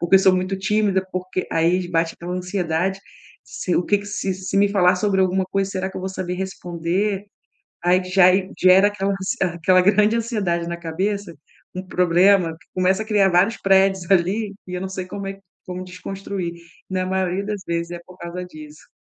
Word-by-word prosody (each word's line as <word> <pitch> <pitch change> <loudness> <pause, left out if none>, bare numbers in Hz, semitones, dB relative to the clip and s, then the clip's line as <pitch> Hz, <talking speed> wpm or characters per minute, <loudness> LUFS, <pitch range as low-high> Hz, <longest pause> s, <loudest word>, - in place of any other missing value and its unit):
porque 175 +3 +5
sou 190 -1 +4
muito 185 +1 -1
tímida, 195 -1 +1
porque 185 0 -3
aí 170 +3 +2
j 175 - -8
bate 165 -1 0
aquela 175 +1 -7
ansiedade, 180 0 -1 0.5
se 180 - -3
o 175 - +1
que 205 - +2
que 200 - -10
"se 205 -1 -2
se 190 +1 -4
me 200 +1 +4
falar 180 -2 +3
sobre 195 0 +1
alguma 185 0 +2
coisa, 195 0 -1
será 190 0 -3
que - - -10
eu - - -4
vou 190 - -3
saber 180 -1 -4
responder?" 190 +2 -2 0.6
Aí 180 +1 +4
q 185 - -9
já 185 -1 +6
e 190 0 -1
gera 185 +2 +6
aquela 200 -1 -2
ansie 195 0 -3 0.2
aquela 185 +2 +4
grande 210 +3 +4
ansiedade 205 -8 -1
na 170 - -3
cabeça, 185 +2 -3 0.4
um 185 - -4
problema 180 0 +3
que - - -24
começa 185 +3 +2
a - - -10
criar 205 -3 +3
vários 185 +6 +3
prédios 195 -2 +2
ali 200 +3 +2
e 180 - -6
eu 180 - -3
não 190 - -3
sei 185 -1 -5
como 200 +2 -6
é - - -3
q 195 - -20 0.3
como 180 0 -5
desconstruir. 180 0 -5 0.4
Na 185 0 -1
maioria 190 +1 -1
das 205 -1 -4
vezes 170 0 -2
é 175 - -6
por 180 - -15
causa 170 +1 -6
disso. 155 -3 -13
185 Hz, 205 wpm, -22 LUFS, 180-195 Hz, 0.6 s, já